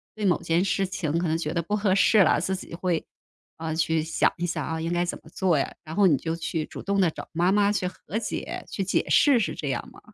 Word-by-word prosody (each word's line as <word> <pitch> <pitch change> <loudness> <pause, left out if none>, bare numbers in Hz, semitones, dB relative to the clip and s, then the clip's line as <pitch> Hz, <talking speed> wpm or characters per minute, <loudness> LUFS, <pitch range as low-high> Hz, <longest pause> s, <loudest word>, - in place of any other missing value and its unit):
对 215 - -3
某 180 - +2
件 170 +2 +1
事 195 0 0
情 180 -5 -2
可 175 - -1
能 160 +1 +1
觉 155 -1 -3
得 170 - 0
不 190 +6 -2
合 205 -2 +2
适 210 +2 +4
了， - - +3
自 190 +2 -1
己 185 - -9
会， 175 -1 -1 0.5
啊， 160 -1 -3
去 160 0 +1
想 160 +1 +1
一 175 - -2
想 170 - -2
啊， 160 0 -3
应 165 - -2
该 175 0 +1
怎 175 - -4
么 160 - -16
做 175 -1 +1
呀， 140 - -1
然 160 -1 -8
后 200 -1 +5
你 150 -6 +4
就 160 +4 -3
去 165 -1 -3
主 - - -9
动 200 0 0
地 175 -4 +3
找 - - -9
妈 175 +3 +2
妈 205 0 +3
去 200 - -1
和 185 +3 -5
解、 230 - -4
去 195 - -2
解 190 - 0
释 280 -4 +5
是 160 -8 -1
这 150 - -5
样 130 - -3
吗？ - - -15
175 Hz, 290 characters per minute, -26 LUFS, 160-195 Hz, 0.5 s, 后